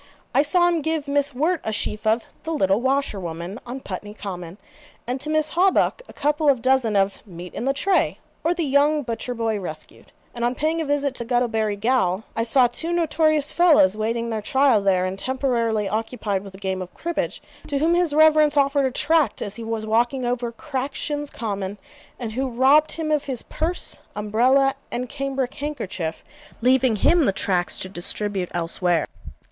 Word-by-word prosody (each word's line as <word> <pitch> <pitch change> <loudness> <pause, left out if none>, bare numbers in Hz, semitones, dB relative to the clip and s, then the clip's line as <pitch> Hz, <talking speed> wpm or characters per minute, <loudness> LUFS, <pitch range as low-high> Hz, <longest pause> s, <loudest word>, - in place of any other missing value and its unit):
I - - +5
saw 350 +4 +3
him 340 -2 +1
give 315 -1 -2
Miss 285 0 +1
Wirt 320 +5 +1
a 220 - -2
sheaf 215 0 -2
of 225 +2 +2 0.2
'The 325 - -5
Little 195 -3 +2
Washer 265 -5 0
woman 170 +4 -6
on 260 +2 -6
Putney 205 +1 -7
Common,' 180 -3 -7 0.5
and 250 +2 -3
to 300 - -3
Miss 310 0 +1
Hawbuck 375 +7 +2
a - - -9
couple 295 +1 +1
of 255 -4 +2
dozen 255 -5 +2
of 195 0 +1
'Meat 180 -1 -9
in 240 - -4
the 270 - +3
Tray; 375 +7 +1 0.3
or 335 +2 +1
the 345 - -1
Young 290 +2 +3
Butcher 235 +1 -4
boy 225 -2 -1
Rescued;' 155 -5 -9 0.2
and 235 - -5
on 240 +1 +1
paying 320 +4 0
a - - -2
visit 285 -1 0
to 240 - -5
Guttlebury 225 -3 0
gaol, 220 -4 +1
I 230 - 0
saw 245 +3 +4
two 280 +8 -2
notorious 310 -3 +1
fellows 310 - +5
waiting 230 +2 -2
their 220 -1 -2
trial 265 -1 +3
there 185 -2 +2
(and 185 +1 -4
temporarily 235 -5 0
occupied 215 -2 -2
with 195 -1 -11
a - - -10
game 190 -1 -3
of 185 - -7
cribbage), 340 +1 -3 0.3
to 285 - -1
whom 320 +4 +2
his 350 -2 +2
Reverence 305 -1 +5
offered 280 0 +3
a - - -3
tract 295 -3 +1
as 205 +1 -4
he 230 - -6
was 225 -1 -3
walking 240 +4 +1
over 240 -1 -1
Crackshins 285 +3 -4
Common, 200 -3 -4 0.4
and 235 -3 -5
who 260 +4 -2
robbed 270 +6 +4
him 315 -1 -3
of 300 -2 +1
his 260 -4 -3
purse, 340 +3 -1 0.2
umbrella, 250 +6 +3 0.2
and 250 +1 -3
cambric 270 -1 -3
handkerchief, 200 - -4 0.4
leaving 255 -1 +3
him 330 - +3
the - - +3
tracts 185 -2 0
to - - -5
distribute 190 +1 0
elsewhere. 175 -1 +1
250 Hz, 185 wpm, -23 LUFS, 210-290 Hz, 0.5 s, I